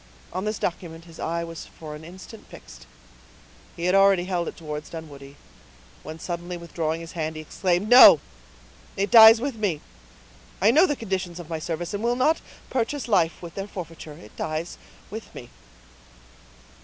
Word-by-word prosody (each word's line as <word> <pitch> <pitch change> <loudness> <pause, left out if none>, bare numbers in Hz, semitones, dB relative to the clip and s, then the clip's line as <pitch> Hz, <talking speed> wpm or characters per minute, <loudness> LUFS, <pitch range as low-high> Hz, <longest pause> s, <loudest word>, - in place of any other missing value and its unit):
On 185 +3 -3
this 215 0 -2
document 170 -1 -5
his 165 -1 -15
eye 170 +1 -2
was 165 -1 -8
for 155 -2 -10
an 150 +1 -10
instant 190 +6 -12
fixed—he 60 - -14
had 180 - +2
already 195 -2 +5
held 180 -2 -2
it - - -7
towards 150 -2 -7
Dunwoodie, 145 -4 -10 0.7
when 155 +2 -8
suddenly 175 +1 -5
withdrawing 165 -1 -3
his 165 - -9
hand 160 -2 -4
he 155 - -6
exclaimed,— 180 +4 -1
"No—it 205 -4 +4
dies 225 0 +10
with 260 -1 -4
me. 195 -8 -1 0.8
I 205 +5 +5
know 320 +8 +5
the 295 - -1
conditions 190 -6 -4
of 170 -2 -10
my 160 - -2
service, 165 +3 -4
and 205 +2 -4
will 240 +1 +1
not 300 +6 +2 0.3
purchase 255 0 -2
life 175 -6 +1
with 170 -2 -8
their 195 +2 -5
forfeiture—it 160 - -10
dies 155 +2 -4 0.3
with 220 +1 -9
me." 120 - -10
175 Hz, 160 wpm, -24 LUFS, 160-205 Hz, 0.8 s, dies